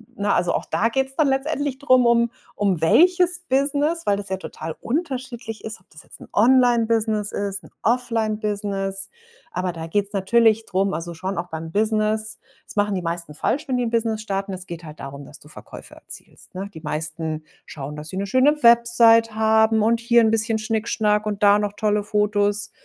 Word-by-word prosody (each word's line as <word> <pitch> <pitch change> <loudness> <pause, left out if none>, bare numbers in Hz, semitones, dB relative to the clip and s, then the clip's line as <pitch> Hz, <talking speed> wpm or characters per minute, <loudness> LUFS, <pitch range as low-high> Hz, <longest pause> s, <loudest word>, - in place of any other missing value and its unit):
na, 205 0 0
also 175 - +1
auch - - -2
da 230 +2 0
geht's 265 +2 -2
dann 305 -1 +2
letztendlich 275 0 -1
drum, 255 -3 +3
um 235 0 +3 0.2
um 195 -6 0
welches 355 - +4
Business, 290 +5 0
weil 200 - +2
das 200 0 -7
ja 190 - -2
total 160 -3 -7
unterschiedlich 255 -6 -4
ist, 220 -2 -7
ob 185 - -32
das 155 - -13
jetzt - - -13
'n - - -12
Online-Business 230 -3 +3
ist, 195 -1 -3
'n - - -15
Offline-Business. 210 -5 -1 0.4
Aber 180 0 -2
da 165 -1 -7
geht's 200 +4 -1
natürlich 220 +3 +2
drum 195 +1 0
also 165 +2 -5
schon 185 +3 -5
auch 175 +1 -3
beim 160 0 -6
Business 215 +1 0 0.3
das - - -13
machen 205 -1 +1
die 185 - -2
meisten 170 -2 -4
falsch, 295 - -1
wenn 255 - +1
die 245 - 0
'n 230 - -2
Business 225 -2 0
starten. 195 -2 -3
Es 185 0 -7
geht 170 0 -8
halt 155 -1 -11
darum, 140 +1 -8
dass - - -13
du - - -17
Verkäufe - - -12
erzielst, - - -13
ne? 195 +2 -5
Die 160 - -10
meisten 155 0 -4 0.2
schauen, 145 0 -8
dass 150 +1 -8
sie 185 - -6
'ne 200 - -1
schöne 270 +8 +2
Website 235 -1 +6
haben 220 0 +3
und 230 +2 +2
hier 235 0 +4
'n 220 - +3
bisschen 225 0 +2
Schnickschnack 215 -1 0
und 210 -1 -3
da 205 0 +6
noch 205 -1 -2
tolle 210 -1 0
Fotos. 210 0 0
215 Hz, 195 wpm, -22 LUFS, 195-235 Hz, 0.4 s, Website